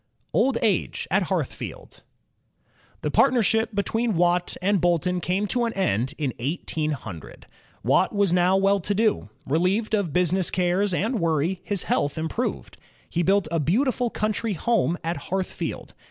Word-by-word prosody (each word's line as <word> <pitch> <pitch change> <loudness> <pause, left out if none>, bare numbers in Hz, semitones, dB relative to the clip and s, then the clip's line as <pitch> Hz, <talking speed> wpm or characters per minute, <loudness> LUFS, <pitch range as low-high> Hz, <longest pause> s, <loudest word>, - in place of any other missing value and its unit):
Old 265 -2 +2
Age 215 -3 0
at - - +2
Heartkfield - - -5 1.0
The - - -2
partnership 225 -2 +3
between 225 +2 0
Watt 175 +1 +1
and 195 0 +1
Boulton 175 +1 +1
came 190 +4 0
to 245 -1 +1
an 230 - -2
end 135 - 0
in 140 -5 -2
1800. 140 - -4 0.4
Watt - - +3
was 200 -4 +2
now 180 +1 +4
well 195 +1 +3
to 205 +3 -2
do. 215 - +1 0.2
Relieved 185 +9 0
of 200 -7 +1
business 180 +2 +2
cares 185 +2 +1
and 220 +7 0
worry 165 +2 0
his 200 -4 -2
health 145 +1 0
improved. 160 +10 -3 0.3
He 175 - 0
built 195 +1 +2
a 165 - +1
beautiful 245 - +1
coimtry 215 -1 -2
home 180 -3 +1
at 165 +2 -2
Hearthfield. 190 0 -4
185 Hz, 145 wpm, -24 LUFS, 170-210 Hz, 1.0 s, now